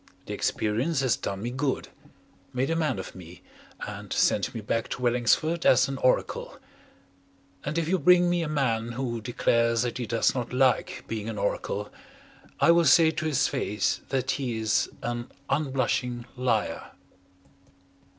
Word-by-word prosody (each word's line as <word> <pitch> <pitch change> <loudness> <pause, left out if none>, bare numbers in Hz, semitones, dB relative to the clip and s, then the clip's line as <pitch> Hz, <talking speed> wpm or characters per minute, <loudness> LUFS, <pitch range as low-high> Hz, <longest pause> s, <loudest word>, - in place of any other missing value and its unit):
The - - -5
experience 125 +8 0
has 130 -3 +2
done 100 +1 -5
me 120 - -2
good, 130 +2 -2 0.6
made 130 +4 0
a - - +1
man 155 -7 0
of 95 - -7
me 90 -1 -12 0.4
and - - -7
sent - - +1
me - - -3
back 115 +2 -2
to - - -5
Wellingsford 125 +8 +2
as 130 - +5
an 135 -1 -4
oracle. 130 - 0 1.1
And 150 +3 -3
if 165 -2 0
you 185 +2 +1
bring 180 +3 +5
me 175 0 +1
a 165 - -2
man 120 -6 0
who 120 -2 -3
declares 115 0 +1
that 120 +1 -3
he 120 - -3
does 115 +2 +2
not 125 -1 -4
like 130 0 +1
being 110 -1 -4
an 110 - -5
oracle, 100 0 -2 0.7
I 170 - +6
will 170 0 +4
say 160 +2 +6
to 160 - -4
his 135 -3 +2
face 130 -1 -1
that 130 -3 0
he 125 -5 -2
is 110 -1 +1
an 120 0 -3 0.2
unblushing 130 -4 0
liar. 125 -4 -1
125 Hz, 160 wpm, -27 LUFS, 115-145 Hz, 1.1 s, I